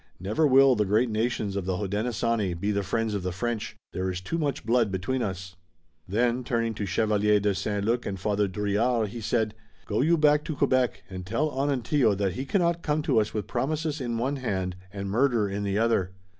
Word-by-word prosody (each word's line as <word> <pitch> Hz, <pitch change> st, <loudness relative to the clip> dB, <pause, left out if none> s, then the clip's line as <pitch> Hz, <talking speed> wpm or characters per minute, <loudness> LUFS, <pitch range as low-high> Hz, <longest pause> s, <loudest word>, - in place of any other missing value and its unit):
Never 105 Hz, -, +1 dB
will 135 Hz, -1 st, +6 dB
the 105 Hz, -, +2 dB
great 110 Hz, +4 st, +2 dB
nations 110 Hz, -2 st, -1 dB
of 100 Hz, -2 st, -2 dB
the 95 Hz, -1 st, -1 dB
Hodenosaunee 105 Hz, -1 st, -1 dB
be 100 Hz, +3 st, 0 dB
the 100 Hz, -1 st, 0 dB
friends 110 Hz, +3 st, -1 dB
of 100 Hz, -, -1 dB
the 90 Hz, 0 st, -2 dB
French. 110 Hz, +2 st, -3 dB, 0.2 s
There 95 Hz, 0 st, -1 dB
is 90 Hz, -1 st, -3 dB
too 165 Hz, -, -3 dB
much 145 Hz, -3 st, -2 dB
blood 115 Hz, -2 st, +2 dB
between 100 Hz, +8 st, -1 dB
us." 95 Hz, -3 st, -4 dB, 0.5 s
Then, 120 Hz, +5 st, +1 dB
turning 115 Hz, -2 st, -1 dB
to 105 Hz, -2 st, -4 dB
Chevalier 105 Hz, +2 st, +2 dB
de 100 Hz, 0 st, +1 dB
St. 100 Hz, +1 st, -2 dB
Luc 120 Hz, +2 st, 0 dB
and 95 Hz, -1 st, -4 dB
Father 105 Hz, +1 st, +1 dB
Drouillard, 105 Hz, +4 st, 0 dB
he 115 Hz, +3 st, -7 dB
said: 110 Hz, 0 st, 0 dB, 0.3 s
"Go 105 Hz, -, 0 dB
you 165 Hz, +4 st, +3 dB
back 150 Hz, -1 st, +4 dB
to 155 Hz, -, -3 dB
Quebec 130 Hz, -2 st, +1 dB
and 95 Hz, -1 st, -7 dB
tell 115 Hz, +11 st, -1 dB
Onontio 135 Hz, -4 st, +1 dB
that 95 Hz, -2 st, -1 dB
he 130 Hz, +8 st, -4 dB
cannot 170 Hz, 0 st, +1 dB
come 150 Hz, -1 st, 0 dB
to 140 Hz, -8 st, +3 dB
us 105 Hz, 0 st, -1 dB
with 105 Hz, -, -2 dB
promises 155 Hz, +1 st, -2 dB
in 120 Hz, -2 st, -2 dB
one 135 Hz, +5 st, -1 dB
hand 95 Hz, -8 st, -2 dB, 0.2 s
and 100 Hz, -1 st, -5 dB
murder 115 Hz, 0 st, +2 dB
in 100 Hz, +1 st, -3 dB
the 100 Hz, 0 st, -1 dB
other. 110 Hz, -5 st, +2 dB
110 Hz, 210 wpm, -27 LUFS, 100-125 Hz, 0.5 s, will